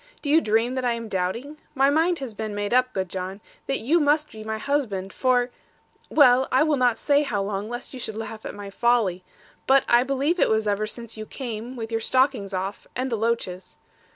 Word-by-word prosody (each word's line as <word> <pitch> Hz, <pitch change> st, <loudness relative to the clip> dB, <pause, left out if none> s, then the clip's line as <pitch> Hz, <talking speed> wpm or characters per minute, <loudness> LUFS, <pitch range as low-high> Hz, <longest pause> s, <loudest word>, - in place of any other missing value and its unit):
Do 285 Hz, -, -1 dB
you 320 Hz, +2 st, +6 dB
dream 225 Hz, +2 st, +1 dB
that 260 Hz, -1 st, -2 dB
I 245 Hz, -1 st, +2 dB
am 230 Hz, -1 st, -5 dB
doubting? 230 Hz, +12 st, -3 dB, 0.2 s
My 275 Hz, +1 st, +4 dB
mind 330 Hz, +4 st, +2 dB
has 265 Hz, -6 st, -6 dB
been 215 Hz, 0 st, -5 dB
made 205 Hz, +2 st, -2 dB
up, 255 Hz, 0 st, +3 dB
good 190 Hz, -1 st, -2 dB
John, 185 Hz, +2 st, -5 dB, 0.3 s
that 270 Hz, -, 0 dB
you 300 Hz, +10 st, +3 dB
must 300 Hz, 0 st, +2 dB
be 215 Hz, -1 st, -9 dB
my 220 Hz, 0 st, -3 dB
husband, 215 Hz, -8 st, -2 dB
for 250 Hz, -1 st, +2 dB, 0.6 s
well, 260 Hz, -3 st, +5 dB
I 260 Hz, -, +4 dB
will 310 Hz, -1 st, +2 dB
not 250 Hz, -3 st, +2 dB
say 285 Hz, 0 st, +3 dB
how 215 Hz, -9 st, -1 dB
long, 200 Hz, +1 st, -3 dB
lest 240 Hz, +3 st, -6 dB
you 260 Hz, -, -7 dB
should 220 Hz, -3 st, -5 dB
laugh 220 Hz, 0 st, -6 dB
at -, -, -6 dB
my 200 Hz, -1 st, -8 dB
folly. 215 Hz, -6 st, +1 dB, 0.4 s
But 270 Hz, 0 st, +5 dB
I 240 Hz, 0 st, +5 dB
believe 275 Hz, +7 st, 0 dB
it -, -, +4 dB
was 220 Hz, -1 st, +1 dB
ever 205 Hz, +1 st, 0 dB
since 230 Hz, 0 st, -7 dB
you 215 Hz, 0 st, -7 dB
came, 240 Hz, -1 st, -6 dB
with 225 Hz, -2 st, -6 dB
your 225 Hz, 0 st, -1 dB
stockings 255 Hz, -5 st, +1 dB
off, 190 Hz, +1 st, -4 dB
and 255 Hz, +1 st, -2 dB
the -, -, +1 dB
loaches. 220 Hz, -5 st, -2 dB
235 Hz, 220 wpm, -24 LUFS, 210-265 Hz, 0.6 s, you